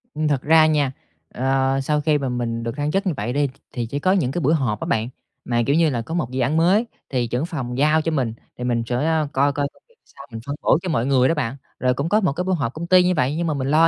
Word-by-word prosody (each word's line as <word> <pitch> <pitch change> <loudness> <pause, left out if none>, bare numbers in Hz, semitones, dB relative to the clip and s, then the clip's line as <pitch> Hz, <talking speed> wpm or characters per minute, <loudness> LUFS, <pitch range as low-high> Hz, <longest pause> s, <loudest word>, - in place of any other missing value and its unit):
Ừm, 155 0 0
thật 140 -3 +1
ra 160 +1 +5
nha, 150 -4 +2 0.4
ờ, 135 +1 +1
sau 150 +2 0
khi 150 -1 +2
mà 135 -2 -2
mình 115 -1 -2
được 115 +4 -4
thăng 145 +1 -1
chức 195 +2 0
như 170 - +1
vậy 115 +4 -2
đi 145 +1 +2
th 130 - -11 0.2
thì 120 -3 -2
chỉ 140 +5 -4
có 185 - +2
những 165 -10 +1
cái 175 - -2
buổi 150 +3 +3
họp 125 -9 0
á - - -4
bạn, 110 +2 0 0.4
mà, 120 -1 +1
kiểu 140 - +3
như 165 -1 +4
là, 120 -4 -1
có 145 +8 -7
một 150 -8 -2
dự 130 - -3
án 145 +6 +1
mới 190 +8 +3 0.2
thì 125 -3 0
trưởng 125 +7 -1
phòng 130 -8 -4
giao 155 +3 +3
cho 165 - -1
mình, 130 -7 -1 0.2
thì 125 - -5
mình 120 -2 0
sẽ, 120 +1 -3
a, 155 +2 +1
coi 140 +2 +3
coi 145 -1 -1
công - - -26
việc 475 - -28
sao 140 +1 -14
mình 115 - -6
phân 140 - -3
bổ - - +4
cho 185 - -4
mọi 135 -7 0
người 130 -1 +3
đó - - +3
bạn. 130 -4 -2 0.2
Rồi 125 0 +2
cũng 140 +6 -2
có 210 - +4
một 180 -7 +1
cái 180 +5 -2
buổi 185 0 0
họp 130 -6 -2
công 170 +2 -6
ty 185 0 +6
như 180 0 +2
vậy 140 +1 +1
nhưng 170 +1 -1
mà 155 - 0
mình 135 -2 -2
lo 160 +3 +5
140 Hz, 310 wpm, -22 LUFS, 125-160 Hz, 0.4 s, ty